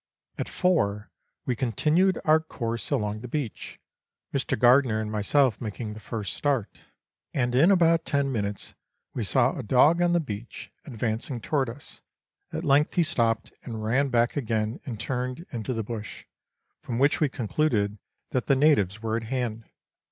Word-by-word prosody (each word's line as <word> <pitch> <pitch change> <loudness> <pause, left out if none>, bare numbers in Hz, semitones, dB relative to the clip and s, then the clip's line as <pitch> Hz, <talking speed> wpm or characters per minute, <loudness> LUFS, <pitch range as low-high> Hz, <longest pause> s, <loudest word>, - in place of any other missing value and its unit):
At - - -3
four 105 - 0 0.3
we 125 - 0
continued 155 - +2
our 155 +1 +6
course 115 -7 -4
along 110 -6 -1
the 125 - -7
beach, 130 -3 -5 0.5
Mr. - - 0
Gardiner 125 -1 +5
and 110 -1 -3
myself 110 +3 +2
making 110 -1 -5
the 110 - -9
first 105 -2 -5
start, 135 -8 -1 0.5
and 125 -2 +1
in 145 +9 +5
about 165 -4 +4
ten 140 -2 0
minutes 100 -4 -3 0.4
we 120 - -2
saw 125 +6 +2
a - - -4
dog 140 +9 +4
on 175 0 +3
the 175 - +4
beach, 115 -6 -7
advancing 120 0 -3
toward 135 +1 0
us; 140 +6 -11 0.5
at - - -4
length 145 -1 +3
he 175 - +4
stopped 115 -7 0
and 110 -3 -6
ran 130 +6 +1
back 120 -1 +2
again 110 -4 -1
and 115 -5 -5
turned 130 +6 -3
into 115 +1 -4
the 115 -3 -2
bush, 105 -1 -7 0.6
from 115 - -4
which 140 +4 +3
we 150 - +3
concluded 110 -5 0 0.3
that 130 - -1
the 140 - +4
natives 115 - +3
were 110 0 0
at 115 - -4
hand. 115 -2 -3
125 Hz, 165 wpm, -26 LUFS, 110-145 Hz, 0.6 s, our